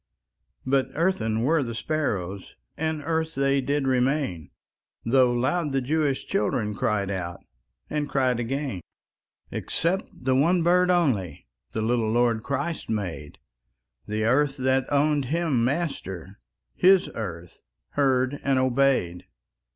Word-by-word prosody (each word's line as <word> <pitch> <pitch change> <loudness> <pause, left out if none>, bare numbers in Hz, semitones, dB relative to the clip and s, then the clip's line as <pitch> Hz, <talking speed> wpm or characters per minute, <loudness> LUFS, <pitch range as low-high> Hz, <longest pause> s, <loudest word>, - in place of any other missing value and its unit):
But 135 0 +1
earthen 115 -11 0
were 155 +6 +2
the 115 -3 -4
sparrows, 100 - -3 0.2
And 160 -1 -2
earth 160 0 -1
they 140 0 +2
did 140 +1 -1
remain, 130 - 0 0.6
Though 125 +1 +4
loud 140 +5 0
the 135 - +2
Jewish 145 +1 0
children 115 - 0
Cried 100 -1 -1
out, 85 -3 -4 0.5
and 150 -1 -2
cried 130 -3 +1
again. 130 -4 -3 0.7
Except 180 +4 -1
the 130 +1 -1
one 165 +6 +3
bird 180 +1 +4
only 125 - +1 0.3
The 110 - -1
little 115 -1 +1
Lord 120 -1 +2
Christ 140 +7 -3
made; 90 -9 -4 0.7
The 105 +1 -1
earth 135 +5 +2
that 130 0 +1
owned 145 0 +2
Him 150 -4 0
Master, 115 - -3 0.3
His 190 0 +5
earth 85 -6 -7 0.3
heard 135 -1 +1
and 135 -1 +2
obeyed. 130 -9 +1
130 Hz, 125 wpm, -25 LUFS, 110-150 Hz, 0.7 s, His